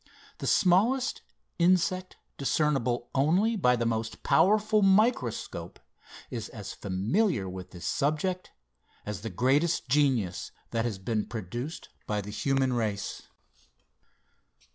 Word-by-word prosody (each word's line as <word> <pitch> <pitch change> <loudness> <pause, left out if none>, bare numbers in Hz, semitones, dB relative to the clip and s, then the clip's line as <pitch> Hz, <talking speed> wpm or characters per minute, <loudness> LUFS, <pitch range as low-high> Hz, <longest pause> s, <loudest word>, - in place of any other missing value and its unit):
The - - -4
smallest 220 +8 +3 0.4
insect 185 +1 +2 0.2
discernible 130 -3 0
only 180 +12 +3
by 125 - +3
the 120 -1 -1
most 115 -1 -2
powerful 210 +8 +4
microscope, 195 - +1 0.5
is 115 -3 -5
as 105 -4 -7
familiar 105 - 0
with 90 0 -7
this 90 -4 -9
subject, 155 +6 -1 0.6
as 105 -3 -5
the 115 - -4
greatest 135 - +1
genius 120 -10 +1 0.2
that 115 0 0
has 110 -5 -2
been 110 +2 -2
produced 120 - -6 0.2
by 105 -1 0
the 105 +1 -8
human 135 +3 +1
race. 105 -4 -3
130 Hz, 115 wpm, -28 LUFS, 110-180 Hz, 0.6 s, powerful